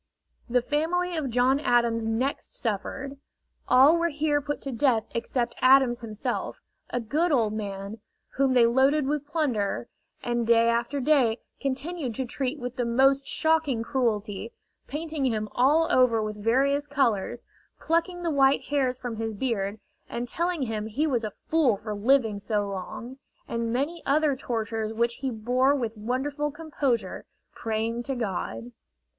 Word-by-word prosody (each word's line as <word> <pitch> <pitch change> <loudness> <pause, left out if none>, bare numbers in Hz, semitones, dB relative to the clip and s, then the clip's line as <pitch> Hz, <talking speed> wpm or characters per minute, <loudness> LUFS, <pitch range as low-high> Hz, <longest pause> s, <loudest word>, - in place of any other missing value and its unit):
The 245 0 +2
family 340 +5 0
of 300 -5 -2
John 250 +3 +3
Adams 235 -4 +2
next 245 +5 -2
suffered. 265 +6 -3 0.5
All 275 +6 +7
were 340 0 +1
here 295 -1 0
put 290 +1 -3
to 275 - -4
death 235 -2 +2
except 235 +1 -1
Adams 255 -2 +5
himself, 215 -3 -4 0.3
a 245 - -1
good 305 +10 0
old 225 -7 +2
man, 200 0 -5 0.3
whom 270 -1 +1
they 240 -2 +6
loaded 265 +5 +3
with 290 +1 -2
plunder, 230 - -1 0.3
and 240 -1 -1
day 230 0 +5
after 235 +5 0
day 260 -5 +3 0.2
continued 275 -1 -3
to 260 - -1
treat 260 +3 -2
with 250 -1 -6
the 245 - +1
most 270 +3 +3
shocking 315 -7 +1
cruelty, 225 -3 -1 0.4
painting 305 0 -4
him 215 -3 -1
all 300 +6 +3
over 250 -3 +4
with 210 -1 -4
various 280 +5 +2
colors, 240 -6 0 0.3
plucking 345 +2 0
the 335 - 0
white 275 -1 +3
hairs 265 -3 +1
from 245 -3 -5
his 225 -1 -3
beard, 205 -3 -2 0.3
and 240 +1 -4
telling 340 +2 -1
him 220 -3 -3
he 270 +8 0
was 250 -7 0
a 215 -2 -4
fool 295 -10 +3
for 215 +1 -5
living 220 0 +2
so 205 0 -1
long, 200 +7 -7 0.3
and 230 0 -2
many 290 +8 -1
other 295 0 +3
tortures 225 -3 -3
which 235 +1 0
he 270 - -1
bore 250 +4 +2
with 235 -5 -3
wonderful 265 +7 -2
composure, 290 -6 -2 0.3
praying 225 +1 -2
to 270 +2 -3
God. 175 - -4
250 Hz, 155 wpm, -26 LUFS, 225-285 Hz, 0.5 s, All